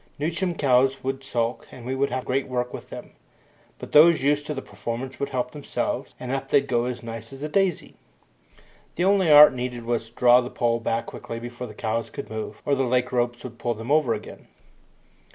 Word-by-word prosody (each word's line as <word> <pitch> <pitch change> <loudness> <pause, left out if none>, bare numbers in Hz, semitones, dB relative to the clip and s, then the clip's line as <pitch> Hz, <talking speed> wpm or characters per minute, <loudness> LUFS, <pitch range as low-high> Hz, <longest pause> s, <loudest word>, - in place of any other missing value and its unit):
New 150 +4 -1
chum 175 +1 -2
cows 135 -1 +2
would 135 +1 -3
sulk, 120 -3 -2
and 120 - -11
we 130 - -2
would 140 +1 0
have 130 - -3
great 135 +1 -1
work 125 -1 -2
with - - -8
them; - - -9 0.7
but - - -9
those 155 0 +6
used 145 +1 +1
to 150 - -2
the 135 - -4
performance 125 +2 -6
would 140 - -2
help 125 -1 -2
themselves, 145 0 -4
and 125 0 -5
up 135 0 -3
they'd 140 -1 +3
go 120 -3 0
as 125 -1 -4
nice 115 0 -7
as 135 +1 -9
a - - -1
daisy. 185 +2 0 1.0
The 175 - +1
only 195 -3 +3
art 150 -1 +10
needed 125 -2 -4
was 115 -1 -2
to - - -29
draw 125 0 +6
the 125 - -5
pole 115 -2 0
back 115 0 -1
quickly 115 - -7
before 120 +1 -7
the 105 - -11
cows 115 +2 -2
could 140 - -8
move, 110 -1 -6
or 145 - +1
the 135 - +1
leg 125 0 0
ropes 120 -1 0
would 120 -2 -9
pull 120 -1 -1
them 115 +5 -6
over 145 -7 +3
again. 105 - -10
125 Hz, 220 wpm, -24 LUFS, 120-140 Hz, 1.0 s, art